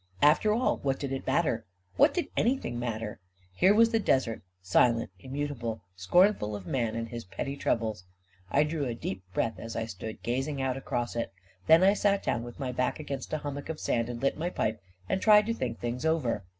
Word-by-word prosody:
After 150 +8 +5
all, 235 +4 +2
what 135 -1 -1
did 140 -2 -3
it 135 - -4
matter? 130 -9 +1 0.3
What - - +5
did 350 - -1
anything 230 - 0
matter? 115 -3 -4 0.3
Here 185 - +4
was 230 +1 +5
the 225 - +3
desert, 130 - +1 0.2
silent, 115 +3 +2
immutable, 130 -4 -4
scornful 105 - +3
of 100 -3 -7
man 115 0 -1
and 115 0 -3
his 120 0 -6
petty 135 +9 -4
troubles. 110 -8 -1 0.4
I 140 +8 +4
drew 150 -1 -2
a 120 -2 -2
deep 95 -4 -4
breath, 110 0 -1
as 115 +2 -7
I 115 - -1
stood 110 +1 -7
gazing 135 +4 -1
out 130 -1 0
across 120 -3 -3
it; 115 - -2 0.4
then 165 +3 +7
I 195 +1 +6
sat 200 -1 +1
down 115 - 0
with 120 0 -9
my 130 -2 -2
back 125 +4 -1
against 140 -3 -5
a - - +2
hummock 145 0 -6
of 160 -1 -4
sand, 115 0 0
and 120 -1 -5
lit 135 - +1
my 170 +2 -1
pipe, 110 - -2 0.3
and 190 - 0
tried 210 0 +7
to 230 - 0
think 125 - -3
things 120 +3 -4
over. 155 - 0
130 Hz, 205 wpm, -29 LUFS, 115-155 Hz, 0.4 s, then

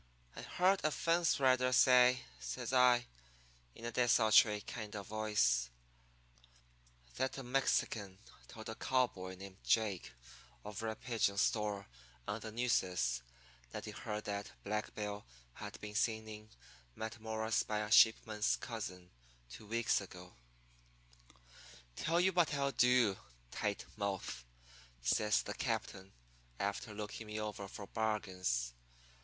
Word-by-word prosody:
"'I - - -7
heard 185 +2 +2
a 155 - +3
fence 165 +2 +2
rider 130 -1 +4
say,' 125 0 +6 0.2
says 60 - -4
I, 125 -1 +5 0.7
in 115 - -9
a 120 - -2
desultory 110 -3 +5
kind 110 -2 -7
of 100 -1 -5
voice, 105 - +1 1.5
'that 130 +2 -1
a 135 - -5
Mexican 120 -6 0 0.3
told 110 -1 -10
a - - -3
cowboy 110 -8 0
named 95 0 -10
Jake 105 -5 +1 0.5
over 105 +2 -4
at 110 - -5
Pidgin's 110 -4 +1
store 105 -2 0 0.4
on 105 - -2
the 110 0 -7
Nueces 90 - +1 0.5
that - - -6
he - - -6
heard 105 0 -5
that 100 0 -4
Black 105 +1 -3
Bill 105 -1 -4 0.3
had - - -8
been 105 0 -7
seen 110 0 0
in 105 0 -9 0.5
Matamoras 110 0 -2
by 105 - -2
a 105 0 -4
sheepman's 110 -1 +5
cousin 90 -6 -6 0.4
two 110 - -11
weeks 115 0 +1
ago.' 90 -2 -11 1.6
"'Tell 165 +3 +1
you 190 +1 +3
what 170 -4 +3
I'll 140 -1 +1
do, 125 -5 +4 0.3
Tight 105 -1 -2
Mouth,' 95 - -3 0.6
says 105 - +2
the - - -4
captain, 95 0 -3 0.5
after 100 +3 -2
looking 105 +1 -6
me 105 0 -4
over 105 -2 -4
for 100 +1 -8
bargains. 95 - -1
110 Hz, 130 wpm, -36 LUFS, 100-120 Hz, 1.6 s, say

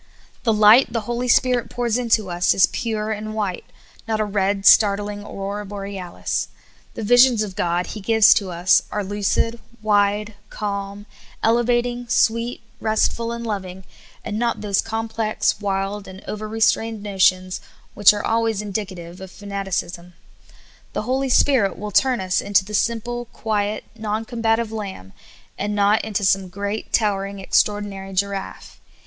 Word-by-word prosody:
The 230 - +4
light 215 +4 +6
the 230 -1 -1
Holy 240 +3 -3
Spirit 250 -1 +2
pours 240 -2 -1
into 230 -4 +1
us 175 0 +2
is 190 - +6
pure 220 -2 -3
and 215 0 -4
white, 200 -5 -3 0.4
not 220 -1 -1
a 215 - +1
red, 200 -1 -1
startling 205 0 +4
aurora 200 0 -5
borealis; 195 -3 -4 0.5
the - - -5
visions 245 0 +5
of 195 -3 -7
God 175 0 0
He 215 - -7
gives 220 +1 +6
to 195 -3 -1
us 175 +1 +3
are 210 - -2
lucid, 205 +4 -1 0.2
wide, 210 0 +2 0.2
calm, 200 -1 -5 0.4
elevating, 240 +1 +1
sweet, 230 +1 +1 0.2
restful, 225 +1 0
and 235 0 -5
loving, 190 -3 -5 0.4
and 215 -1 -3
not 235 0 -1
those 200 -2 +1
complex, 225 -1 -1
wild, 200 0 -2
and 190 0 -11
overstrained 220 0 0
notions 185 -2 +1 0.3
which 205 - +7
are 205 0 -4
alwaj^s 225 -2 0
indicative 185 -4 -6
of 190 - -8
fa 205 - -14
naticism. 190 -3 -4 0.8
The - - -2
Holy 265 +1 -1
Spirit 250 -7 +3
will 210 +2 -6
turn 255 +4 +3
us 185 -1 0
into 200 -1 +2
the 210 - -9
simple, 235 +3 -1
quiet, 215 -2 -2
non 220 0 -3
combative 225 -1 0
lamb, 195 - -7 0.5
and 205 +1 -2
not 205 +1 +3
into 210 -2 -2
some 190 0 +2
great, 200 +3 -4
towering 200 -2 0
extraordinary 195 0 -1
giraffe. 195 +1 -4
210 Hz, 145 wpm, -21 LUFS, 195-225 Hz, 0.8 s, which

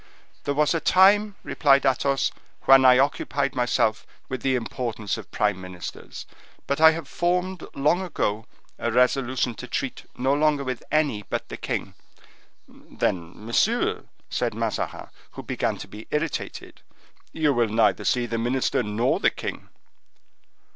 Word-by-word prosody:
"There 145 - -1
was 150 +2 +3
a 165 - +1
time," 200 +4 +4
replied 140 -2 +3
Athos, 135 +1 +1 0.3
"when 135 0 +7
I 125 -1 +8
occupied 140 0 0
myself 120 -3 0 0.2
with 130 -2 -4
the 130 -1 +1
importance 115 -3 -3
of 110 -4 -9
prime 105 -3 0
ministers; 90 -1 -8 0.4
but 140 +2 -1
I 160 - +10
have 160 -3 -6
formed, 180 +2 -1
long 150 +6 +2
ago, 110 - -2 0.3
a 120 - -1
resolution 125 0 +1
to 125 - -9
treat 130 +1 -4
no 130 +2 +1
longer 150 -1 +2
with 130 -3 -4
any 150 -8 +1
but - - -5
the - - -5
king." - - -4 0.7
"Then, 85 -1 -3
monsieur," 220 - +1 0.2
said - - -2
Mazarin, - - -3 0.2
who - - -8
began - - -2
to - - -8
be - - -11
irritated, - - -4 0.5
"you 150 -3 +1
will 120 -3 +1
neither 110 +1 +2
see 125 -1 +1
the 115 -1 -3
minister 125 +2 0
nor 115 +3 0
the - - +4
king." - - -7
130 Hz, 145 wpm, -24 LUFS, 115-150 Hz, 0.7 s, I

